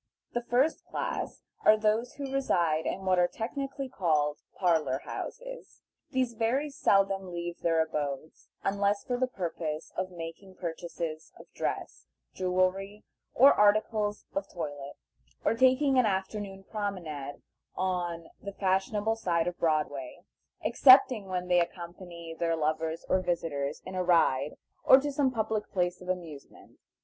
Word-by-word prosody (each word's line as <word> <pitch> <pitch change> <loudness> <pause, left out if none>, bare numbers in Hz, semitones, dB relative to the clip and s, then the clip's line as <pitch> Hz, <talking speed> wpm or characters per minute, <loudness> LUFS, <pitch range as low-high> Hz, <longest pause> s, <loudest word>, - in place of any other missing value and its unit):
The 240 - 0
first 250 +6 +1
class - - -4 0.2
are 215 - +7
those 215 +3 +1
who 275 -1 -6
reside 170 -12 +1
in 190 +1 -3
what 185 -1 +3
are 175 - +5
technically 275 +6 -4
called 155 - +1 0.2
"Parlor 160 -8 +2
Houses." - - -7 0.3
These 255 -3 0
very 255 +7 0
seldom 195 -8 +2
leave 175 0 -5
their 165 -1 +3
abodes, 150 -1 -5 0.2
unless 200 +1 +1
for 250 - -1
the 255 - +2
purpose 165 -7 -4
of 185 0 -2
making 175 +2 -9
purchases 165 -2 -5
of - - -12
dress, - - -4 0.3
jewelry, 185 +2 0 0.3
or 275 +4 +8
articles 210 0 +2
of 295 - -2
toilette, 145 -4 -6 0.5
or - - +4
taking 260 +3 +4
an 245 - +4
afternoon 195 0 -3
promenade 170 -10 -5 0.3
on 175 -3 -2
the 200 - -6
fashionable 200 +3 +1
side 170 -6 +1
of 175 0 -4
Broadway, 150 -1 -1 0.4
excepting 255 -6 +6
when 180 -1 -3
they 180 -1 +4
accompany 170 -1 -5
their 165 0 0
lovers 160 +1 -1
or 185 - +3
visitors 155 -5 -2
in 185 - -7
a 185 0 0
ride, 150 -5 +3 0.3
or 260 - +9
to 290 +1 -2
some 275 -1 +2
public 220 -3 -2
place 180 -1 0
of 180 - -9
amusement. 165 -6 -7
185 Hz, 140 wpm, -29 LUFS, 165-220 Hz, 0.5 s, or